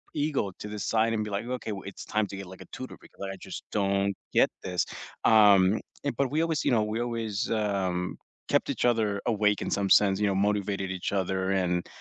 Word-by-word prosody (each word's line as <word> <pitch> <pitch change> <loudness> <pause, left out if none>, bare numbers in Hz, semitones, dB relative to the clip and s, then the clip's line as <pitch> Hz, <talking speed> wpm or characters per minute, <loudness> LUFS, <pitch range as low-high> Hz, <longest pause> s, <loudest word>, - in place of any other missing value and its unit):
ego 145 -9 0
to 105 - -6
the 105 0 -5
side 115 0 +2
and 110 -1 0
be 105 - -5
like, 105 - -3
"Okay, 125 -3 -4
w 100 -2 -5
it's 100 - -8
time 105 -1 0
to 100 - -8
get, 100 - -6
like, 95 0 -11
a - - -59
tutor - - -7
because - - -17
I - - -9
just - - -6
don't 100 -1 +1 0.2
get - - +5
this," 90 -3 0 0.4
um, 105 -2 +6 0.3
and 140 - 0
but 140 -2 +1
we 155 +2 +1
always 160 -3 -1
you - - +3
know, 110 -3 +3
we 110 +2 -2
always, 115 -2 -2
um, 95 -4 -1 0.4
kept - - -6
each - - 0
other 105 -3 0
awake 105 -2 +2
in - - -3
some 100 -1 0
sense, 100 -1 +5
you 105 - +2
know, 100 - +1
motivated 100 -1 0
each 95 +1 -3
other, 95 +1 -2 0.2
and 90 -1 -1
105 Hz, 225 wpm, -28 LUFS, 95-110 Hz, 0.4 s, um